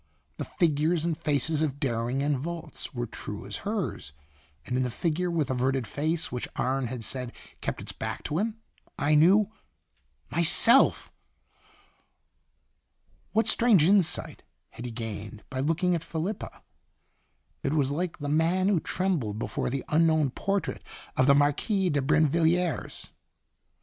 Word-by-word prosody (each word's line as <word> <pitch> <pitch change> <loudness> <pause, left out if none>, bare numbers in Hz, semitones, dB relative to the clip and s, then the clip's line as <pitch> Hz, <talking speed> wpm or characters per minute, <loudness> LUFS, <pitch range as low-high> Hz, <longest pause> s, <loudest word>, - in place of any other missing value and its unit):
The - - -4
figures 160 0 +1
and 170 -2 0
faces 150 0 0
of 145 -3 -1
Dering 125 +1 -1
and 145 0 +1
Volz 165 +3 -6
were 120 -3 -3
true 105 -3 -7
as 100 - -5
hers, 200 - -4 0.5
and 125 - -3
in 130 - +1
the 125 - 0
figure 170 +7 -1
with 155 -5 -1
averted 130 0 0
face 155 +8 -2
which 125 - -4
Arne 130 0 0
had 120 -1 -6
said 125 +1 -2 0.3
kept - - -3
its - - -6
back - - -5
to 155 +3 -2
him, 220 +2 -2 0.4
I 145 +1 +1
knew 190 +7 +5 0.8
myself! 170 - +5 2.2
What 225 +2 +2
strange 230 -9 +5
insight 190 0 +2 0.3
had 120 - -9
he 120 - -4
gained 110 -2 -7
by 130 - -3
looking 165 +6 +1
at 165 -2 -1
Felipa? 165 +5 -5 1.0
It - - -1
was 140 -3 +1
like 170 +3 -2
the 145 - -5
man 165 +6 +2
who 195 -5 +3
trembled 160 - -1
before 115 - -2
the 135 +1 -3
unknown 155 -3 +3
portrait 195 +5 -2 0.3
of 130 - +3
the 140 - +6
Marquise 175 +7 +1
de 145 -1 +1
Brinvilliers. 160 +4 +1
155 Hz, 145 wpm, -27 LUFS, 130-175 Hz, 2.2 s, the